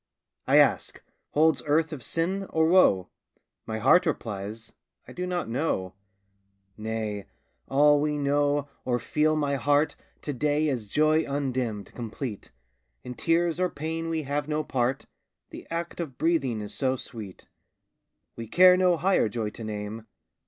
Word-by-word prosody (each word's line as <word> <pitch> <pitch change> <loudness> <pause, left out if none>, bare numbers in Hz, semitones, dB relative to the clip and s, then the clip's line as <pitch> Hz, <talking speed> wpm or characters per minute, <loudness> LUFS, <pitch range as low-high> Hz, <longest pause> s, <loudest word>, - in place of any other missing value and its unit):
I - - +5
ask, - - +2 0.3
"Holds 160 +1 +3
earth 155 +2 +2
of 140 - -7
sin, 190 +8 -2
or 160 0 +2
woe?" 130 - +4 0.6
My 110 - -3
heart 180 - +4
replies, 110 -5 -4 0.3
"I - - -10
do 180 0 -4
not 180 -1 -2
know." 115 - -2 0.8
Nay! 110 -2 -4 0.4
all 145 +1 +4
we 150 0 0
know, 145 0 +1 0.2
or 125 -1 0
feel, 150 +6 +1
my 145 -2 0
heart, 145 +4 +2 0.3
To 145 - -3
day 150 +3 +1
is 120 -6 -3
joy 155 +7 +3
undimmed, 130 -7 -2
complete; 115 -1 -6 0.5
In 125 - -6
tears 165 +4 +1
or 180 0 +2
pain 165 +2 -4
we 160 -1 -1
have 145 +1 -2
no 155 0 -1
part; 130 -1 -1 0.5
The - - -10
act 170 +1 -4
of 145 -7 -5
breathing 140 -9 +1
is 105 - -7
so 130 -1 0
sweet, 110 -7 -9 0.9
We 115 -1 -7
care 180 +8 +7
no 180 -2 +3
higher 180 - +2
joy 110 -1 -3
to 115 - -9
name. 110 +1 -6
145 Hz, 150 wpm, -27 LUFS, 115-160 Hz, 0.9 s, care